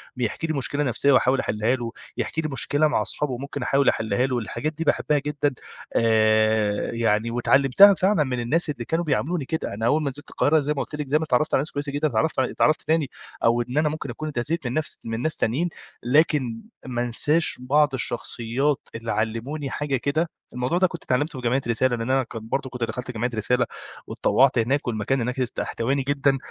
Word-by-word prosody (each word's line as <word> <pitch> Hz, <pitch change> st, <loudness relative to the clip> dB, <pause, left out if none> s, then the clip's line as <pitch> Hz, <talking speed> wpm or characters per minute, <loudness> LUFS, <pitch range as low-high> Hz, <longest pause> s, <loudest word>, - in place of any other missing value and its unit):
بيحكي 125 Hz, +6 st, -2 dB
لي 160 Hz, -, -1 dB
مشكلة 145 Hz, +1 st, 0 dB
نفسية 135 Hz, +1 st, +2 dB
وأحاول 130 Hz, 0 st, +3 dB
أحِلها 110 Hz, +4 st, 0 dB
له، 120 Hz, -2 st, -5 dB, 0.3 s
يحكي 160 Hz, -, -2 dB
لي 155 Hz, -, -3 dB
مشكلة 145 Hz, +3 st, +3 dB
مع 150 Hz, -, +1 dB
أصحابه 135 Hz, -4 st, -3 dB
ممكن 140 Hz, +2 st, -6 dB
أحاول 135 Hz, +2 st, +3 dB
أحِلها 110 Hz, +2 st, 0 dB
له. 130 Hz, -1 st, -1 dB
الحاجات 150 Hz, +7 st, -3 dB
دي 160 Hz, +2 st, -4 dB
باحِبها 150 Hz, -1 st, +1 dB
جدًا 145 Hz, 0 st, -1 dB, 0.4 s
آآ 110 Hz, -2 st, +2 dB
يعني، 115 Hz, -1 st, +1 dB
واتعلَّمتها 135 Hz, +10 st, +6 dB
فعلًا 190 Hz, -2 st, +2 dB
من 130 Hz, -3 st, -3 dB
الناس 150 Hz, +8 st, +1 dB
اللي 120 Hz, -5 st, -4 dB
كانوا 165 Hz, +5 st, -1 dB
بيعاملوني 150 Hz, +2 st, -1 dB
كده. 160 Hz, -4 st, -3 dB
أنا 110 Hz, +3 st, -3 dB
أول 150 Hz, +6 st, +3 dB
ما 140 Hz, -, 0 dB
نزلت 145 Hz, +2 st, -8 dB
القاهرة 155 Hz, +2 st, +2 dB
زي 150 Hz, +1 st, -1 dB
ما 145 Hz, -, -4 dB
قُلت -, -, -8 dB
لك، 150 Hz, -1 st, -4 dB
زي 145 Hz, +3 st, +3 dB
ما 155 Hz, -, -2 dB
اتعرَّفت 150 Hz, 0 st, +1 dB
على -, -, +4 dB
ناس 150 Hz, -, -4 dB
كويسة 145 Hz, 0 st, -3 dB
جدًا، 145 Hz, +2 st, 0 dB
اتعرَّفت 135 Hz, +4 st, 0 dB
ع -, -, +4 dB
اتعرَّفت 155 Hz, +4 st, +1 dB
تاني 160 Hz, -4 st, 0 dB, 0.3 s
أو 115 Hz, +1 st, +3 dB
إن 125 Hz, +3 st, -4 dB
أنا 155 Hz, 0 st, +3 dB
ممكن 150 Hz, -2 st, -5 dB
أكون 155 Hz, +6 st, -5 dB
اتأذيت 145 Hz, +2 st, -2 dB
من 120 Hz, -, -3 dB
نفس 155 Hz, +1 st, -2 dB
من 115 Hz, 0 st, -3 dB
ناس 155 Hz, +3 st, -1 dB
تانيين، 145 Hz, +11 st, 0 dB, 0.3 s
لكن 130 Hz, -3 st, +2 dB, 0.2 s
ما 120 Hz, -2 st, -2 dB
انساش 145 Hz, +8 st, +1 dB
بعض 145 Hz, +3 st, +2 dB
الشخصيات 125 Hz, +3 st, -1 dB
اللي 115 Hz, 0 st, -4 dB
علَّموني 115 Hz, +7 st, -2 dB
حاجة 145 Hz, -1 st, -2 dB
كده. 155 Hz, +6 st, -1 dB, 0.2 s
الموضوع 125 Hz, +7 st, -1 dB
ده 185 Hz, +1 st, +4 dB
كنت 170 Hz, -3 st, -8 dB
اتعلَّمته 135 Hz, +2 st, -1 dB
في 120 Hz, -, -1 dB
جمعية 130 Hz, +3 st, +1 dB
رسالة، 120 Hz, +2 st, +2 dB
لإن 115 Hz, +1 st, -4 dB
أنا 135 Hz, 0 st, +3 dB
كانت 115 Hz, -2 st, -8 dB
برضه 135 Hz, -1 st, -1 dB
كنت 125 Hz, -2 st, -5 dB
دخَلت 120 Hz, +3 st, -4 dB
جمعية 120 Hz, +1 st, -2 dB
رسالة 125 Hz, +3 st, +1 dB, 0.4 s
واتطوَّعت 135 Hz, -1 st, +2 dB
هناك، 130 Hz, +5 st, 0 dB
والمكان 120 Hz, +3 st, 0 dB
هناك 125 Hz, +3 st, -2 dB
است 125 Hz, -2 st, -2 dB
احتواني 135 Hz, +4 st, -1 dB
جدًا. 140 Hz, 0 st, +1 dB
135 Hz, 210 wpm, -24 LUFS, 120-150 Hz, 0.4 s, واتعلَّمتها